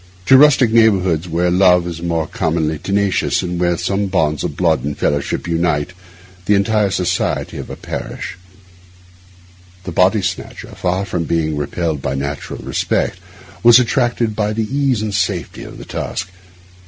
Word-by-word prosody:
To 135 Hz, -, +6 dB
rustic 135 Hz, -4 st, +6 dB
neighbourhoods, 95 Hz, -7 st, +3 dB
where 85 Hz, +2 st, +1 dB
love 90 Hz, -1 st, +4 dB
is 85 Hz, -1 st, -6 dB
more 85 Hz, -2 st, -1 dB
than -, -, -17 dB
commonly 80 Hz, -6 st, -1 dB
tenacious, 100 Hz, -1 st, 0 dB
and 90 Hz, -1 st, -3 dB
where 85 Hz, -1 st, +1 dB
some 100 Hz, +3 st, -1 dB
bonds 80 Hz, -5 st, 0 dB
of -, -, -4 dB
blood 65 Hz, -, +2 dB
or 75 Hz, +1 st, -3 dB
fellowship 70 Hz, -1 st, -1 dB
unite 85 Hz, -1 st, 0 dB, 0.5 s
the 105 Hz, -, +4 dB
entire 105 Hz, +1 st, +2 dB
society 90 Hz, -2 st, -1 dB
of -, -, -7 dB
a -, -, -6 dB
parish, -, -, -6 dB, 1.5 s
the 90 Hz, -, -6 dB
body 95 Hz, +4 st, +3 dB
snatcher, -, -, -5 dB
far 90 Hz, +2 st, -1 dB
from 85 Hz, -4 st, -3 dB
being 80 Hz, -2 st, 0 dB
repelled 75 Hz, +1 st, -2 dB
by 65 Hz, -, -2 dB
natural 70 Hz, +1 st, -5 dB
respect, -, -, -1 dB, 0.4 s
was 120 Hz, 0 st, +8 dB
attracted 120 Hz, -3 st, +1 dB
by 105 Hz, 0 st, 0 dB
the 110 Hz, 0 st, -1 dB
ease 135 Hz, -6 st, +1 dB
and 105 Hz, -2 st, -3 dB
safety 95 Hz, -3 st, -2 dB
of -, -, -10 dB
the -, -, -10 dB
task. 95 Hz, 0 st, -4 dB
90 Hz, 160 wpm, -18 LUFS, 80-105 Hz, 1.5 s, was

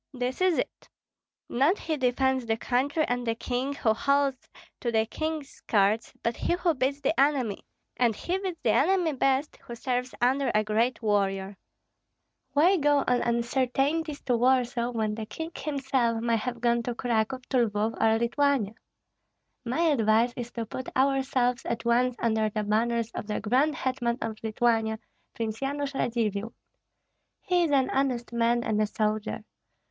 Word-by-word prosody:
This 250 Hz, +5 st, -3 dB
is 370 Hz, -3 st, +3 dB
it: -, -, -4 dB, 0.6 s
not 285 Hz, +11 st, +2 dB
he 320 Hz, -, -2 dB
defends 260 Hz, -1 st, +1 dB
the 225 Hz, 0 st, +1 dB
country 280 Hz, +6 st, 0 dB
and 245 Hz, 0 st, -1 dB
the 225 Hz, -, +1 dB
king 255 Hz, +4 st, -2 dB
who 220 Hz, -5 st, +2 dB
holds 280 Hz, +2 st, 0 dB, 0.3 s
to 240 Hz, -, -2 dB
the 220 Hz, -1 st, +2 dB
king's 310 Hz, +3 st, -4 dB
skirts, 210 Hz, 0 st, +1 dB
but 230 Hz, 0 st, 0 dB
he -, -, -1 dB
who 350 Hz, -1 st, +1 dB
beats 275 Hz, +1 st, -1 dB
the -, -, +1 dB
enemy; 270 Hz, -7 st, +1 dB, 0.3 s
and 235 Hz, -3 st, +2 dB
he 360 Hz, -, -2 dB
beats 375 Hz, -3 st, -4 dB
the 225 Hz, -, +3 dB
enemy 325 Hz, -, +2 dB
best 270 Hz, +2 st, 0 dB
who 235 Hz, -, -9 dB
serves 250 Hz, +1 st, -2 dB
under 265 Hz, +3 st, +2 dB
a 215 Hz, -, +4 dB
great 225 Hz, +4 st, 0 dB
warrior. 195 Hz, -2 st, 0 dB, 1.0 s
Why 345 Hz, +7 st, +5 dB
go 290 Hz, -2 st, +3 dB
on 250 Hz, -1 st, +2 dB
uncertainties 270 Hz, +6 st, 0 dB
to 245 Hz, -2 st, +1 dB
Warsaw, 245 Hz, -1 st, +2 dB
when 220 Hz, -3 st, -1 dB
the 215 Hz, 0 st, -5 dB
king 320 Hz, +9 st, -6 dB
himself 265 Hz, -5 st, 0 dB
may 230 Hz, 0 st, +1 dB
have 235 Hz, +1 st, -4 dB
gone 235 Hz, 0 st, +2 dB
to 240 Hz, 0 st, -4 dB
Cracow, 235 Hz, +1 st, 0 dB
to 245 Hz, -3 st, +3 dB
Lvoff 210 Hz, +2 st, -1 dB
or 225 Hz, 0 st, +4 dB
Lithuania? 240 Hz, -2 st, +1 dB, 0.9 s
My 250 Hz, +7 st, -1 dB
advice 240 Hz, -6 st, +3 dB
is 240 Hz, -1 st, -5 dB
to 230 Hz, -1 st, -3 dB
put 255 Hz, +4 st, -6 dB
ourselves 265 Hz, -2 st, +1 dB
at 235 Hz, 0 st, -3 dB
once 245 Hz, +1 st, +2 dB
under 220 Hz, -2 st, +1 dB
the 215 Hz, 0 st, -2 dB
banners 230 Hz, +2 st, 0 dB
of 210 Hz, -, -6 dB
the 210 Hz, -, -2 dB
grand 265 Hz, +7 st, +2 dB
hetman 245 Hz, -3 st, -1 dB
of 220 Hz, -1 st, -4 dB
Lithuania, 225 Hz, 0 st, +1 dB, 0.4 s
Prince 225 Hz, -1 st, -3 dB
Yanush 280 Hz, +1 st, -2 dB
Radzivill. 225 Hz, -4 st, -1 dB, 0.9 s
He 355 Hz, -2 st, +2 dB
is -, -, -1 dB
an 270 Hz, -2 st, +2 dB
honest 255 Hz, -3 st, -1 dB
man 235 Hz, 0 st, +2 dB
and 215 Hz, -3 st, 0 dB
a 215 Hz, -, +2 dB
soldier. 215 Hz, 0 st, -2 dB
245 Hz, 165 wpm, -27 LUFS, 225-275 Hz, 1.0 s, Why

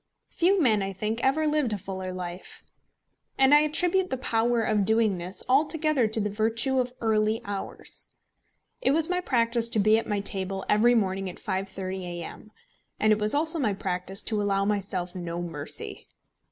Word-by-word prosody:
Few 375 Hz, +3 st, +2 dB
men, 225 Hz, -, +3 dB
I 195 Hz, 0 st, -3 dB
think, 215 Hz, +4 st, -3 dB
ever 295 Hz, +4 st, +2 dB
lived 300 Hz, -6 st, +1 dB
a -, -, -1 dB
fuller 190 Hz, -1 st, -6 dB
life. 180 Hz, 0 st, -7 dB, 0.7 s
And 270 Hz, +1 st, +5 dB
I 295 Hz, -, +8 dB
attribute 355 Hz, +5 st, +2 dB
the 260 Hz, -, -2 dB
power 235 Hz, -2 st, +1 dB
of 215 Hz, -2 st, +1 dB
doing 220 Hz, -2 st, +2 dB
this 180 Hz, +3 st, -4 dB
altogether 300 Hz, -1 st, +2 dB
to 220 Hz, +1 st, 0 dB
the 210 Hz, -, 0 dB
virtue 225 Hz, +5 st, +1 dB
of 250 Hz, -1 st, -1 dB
early 220 Hz, -1 st, +1 dB
hours. 200 Hz, -1 st, -5 dB, 0.7 s
It 265 Hz, -, +3 dB
was 325 Hz, +2 st, +1 dB
my 360 Hz, 0 st, 0 dB
practice 235 Hz, -5 st, +1 dB
to 230 Hz, -, 0 dB
be 215 Hz, +2 st, +4 dB
at 225 Hz, -, -7 dB
my 205 Hz, -1 st, 0 dB
table 195 Hz, -1 st, -2 dB
every 235 Hz, +4 st, +4 dB
morning 195 Hz, -3 st, 0 dB
at 180 Hz, -, -8 dB
5.30 190 Hz, 0 st, -4 dB
A.M.; 175 Hz, +4 st, -8 dB, 0.5 s
and 215 Hz, 0 st, +4 dB
it 215 Hz, -, -1 dB
was 210 Hz, +4 st, +3 dB
also 320 Hz, +2 st, +3 dB
my 215 Hz, -8 st, 0 dB
practice 190 Hz, +1 st, -3 dB
to 215 Hz, -2 st, 0 dB
allow 195 Hz, -1 st, +1 dB
myself 195 Hz, -3 st, -2 dB
no 175 Hz, -2 st, -5 dB
mercy. 165 Hz, -5 st, -5 dB
215 Hz, 180 wpm, -26 LUFS, 195-255 Hz, 0.7 s, I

